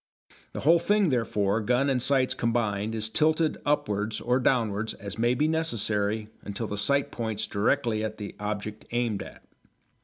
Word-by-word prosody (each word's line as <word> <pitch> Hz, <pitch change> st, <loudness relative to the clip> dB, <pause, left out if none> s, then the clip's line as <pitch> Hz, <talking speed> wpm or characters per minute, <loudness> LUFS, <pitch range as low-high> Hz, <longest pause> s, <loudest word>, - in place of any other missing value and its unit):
The -, -, -4 dB
whole 165 Hz, +4 st, +5 dB
thing, 205 Hz, 0 st, +2 dB
therefore, 110 Hz, -4 st, +1 dB
gun 125 Hz, +5 st, +2 dB
and 130 Hz, -3 st, +1 dB
sights 130 Hz, 0 st, +3 dB
combined, 110 Hz, -2 st, -1 dB
is 110 Hz, -1 st, -1 dB
tilted 155 Hz, +6 st, +1 dB
upwards 105 Hz, -7 st, 0 dB
or 125 Hz, +2 st, +1 dB
downwards 110 Hz, -4 st, +1 dB
as 100 Hz, +1 st, -7 dB
may 120 Hz, +2 st, +3 dB
be 150 Hz, +4 st, +2 dB
necessary 110 Hz, -9 st, 0 dB
until 100 Hz, +3 st, -4 dB
the 105 Hz, -, -4 dB
sights 140 Hz, +7 st, +1 dB
point 110 Hz, -2 st, -2 dB
directly 110 Hz, +1 st, +1 dB
at 110 Hz, 0 st, -4 dB
the 105 Hz, -2 st, -7 dB
object 105 Hz, +1 st, -4 dB
aimed 120 Hz, -4 st, -1 dB
at. -, -, -11 dB
115 Hz, 160 wpm, -27 LUFS, 105-130 Hz, -, whole